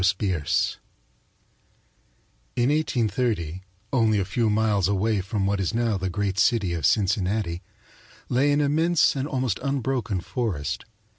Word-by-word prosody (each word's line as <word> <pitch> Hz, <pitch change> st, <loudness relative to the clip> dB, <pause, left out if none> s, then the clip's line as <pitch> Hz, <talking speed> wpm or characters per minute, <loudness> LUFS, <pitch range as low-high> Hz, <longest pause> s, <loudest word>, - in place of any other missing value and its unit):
THE 95 Hz, +1 st, +3 dB
BOARDED 100 Hz, -1 st, 0 dB
WINDOW 80 Hz, -5 st, 0 dB, 1.8 s
In 120 Hz, +2 st, +2 dB
1830, 115 Hz, -, -1 dB, 0.3 s
only 110 Hz, -4 st, +3 dB
a 95 Hz, -, 0 dB
few 115 Hz, +3 st, 0 dB
miles 105 Hz, -3 st, +2 dB
away 100 Hz, +1 st, +1 dB
from 100 Hz, +1 st, -2 dB
what 100 Hz, 0 st, 0 dB
is 95 Hz, +3 st, -1 dB
now 115 Hz, -4 st, +1 dB
the 95 Hz, 0 st, -2 dB
great 95 Hz, +2 st, -2 dB
city 105 Hz, -5 st, +2 dB
of 80 Hz, -5 st, +1 dB
Cincinnati, 95 Hz, -3 st, 0 dB, 0.7 s
lay 135 Hz, +4 st, +2 dB
an 145 Hz, +1 st, +2 dB
immense 160 Hz, +4 st, +3 dB
and 135 Hz, +1 st, -2 dB
almost 130 Hz, -8 st, -1 dB
unbroken 130 Hz, -6 st, -1 dB
forest. 85 Hz, -, -3 dB
105 Hz, 140 wpm, -25 LUFS, 95-125 Hz, 1.8 s, THE